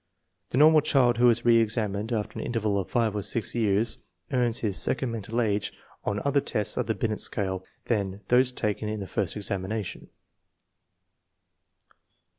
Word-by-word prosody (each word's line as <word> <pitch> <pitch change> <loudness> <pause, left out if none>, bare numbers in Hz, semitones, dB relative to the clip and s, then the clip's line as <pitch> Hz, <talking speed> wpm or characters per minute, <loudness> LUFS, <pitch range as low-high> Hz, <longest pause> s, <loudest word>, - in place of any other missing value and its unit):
The - - -2
normal 155 +1 +7
child 130 -6 +3
who 125 0 +6
is 120 0 +2
reSxamined 115 -2 +2
after 110 -3 -2
an - - -3
interval 110 -4 0
of 95 - -4
five 115 -4 +1
or 105 - -1
six 110 +2 0
years 110 -1 +1 0.3
earns 120 -3 +1
his 100 -4 0
second 130 -3 0
mental 115 +1 -3
age 105 -3 0 0.3
on 100 - -1
other 140 0 +3
tests 105 -5 -1
of - - -1
the - - 0
Binet - - -2
scale 95 -2 -1 0.2
than 100 -3 -1
those 125 +1 +4
taken 105 -3 -2
in 110 0 -3
the 100 - -5
first - - -2
examination. 100 0 -4
110 Hz, 160 wpm, -27 LUFS, 100-120 Hz, 0.3 s, normal